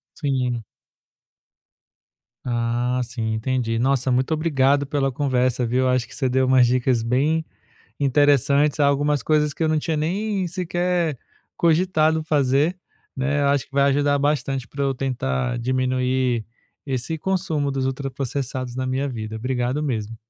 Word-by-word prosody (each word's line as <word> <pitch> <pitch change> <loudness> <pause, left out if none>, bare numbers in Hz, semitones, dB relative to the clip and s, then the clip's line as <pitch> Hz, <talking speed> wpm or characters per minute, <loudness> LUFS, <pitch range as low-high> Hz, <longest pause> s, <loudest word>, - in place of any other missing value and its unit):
Sim. 125 -6 -1 1.8
Ah, 120 +1 -1
sim, 115 -2 -3
entendi. 115 0 -1
Nossa, 130 0 +1
muito 130 +5 +1
obrigado 145 -3 +2
pela 135 -1 0
conversa, 130 -2 0
viu. 130 +2 +1
Acho 125 -2 +1
que - - -12
você 130 -3 0
deu 130 +1 +2
umas 130 -2 +5
dicas 125 -1 +1
bem 150 +7 +1 0.6
interessantes, 145 +1 +3
algumas 145 0 +2
coisas 150 -1 +2
que 165 - -5
eu 160 - +2
não 155 -1 +2
tinha 155 +1 -2
nem 190 +4 -1
sequer 175 -4 -1 0.4
cogitado 160 -2 +2
fazer, 150 +3 +1 0.4
né. 140 +2 0
Eu 140 - +3
acho 140 -2 +1
que - - -37
vai 140 0 +3
ajudar 145 +1 +2
bastante 135 -3 -1
pra 140 0 -4
eu 135 -1 +1
tentar 65 - -2
diminuir 130 -1 0 0.4
esse 135 +4 -3
consumo 165 -6 -1
dos 135 -1 -1
ultraprocessados 130 -1 -4
na 130 0 -2
minha 135 +2 -1
vida. 110 -3 -5
Obrigado 125 +4 -1
mesmo. 115 -5 -3
135 Hz, 140 wpm, -22 LUFS, 125-150 Hz, 1.8 s, umas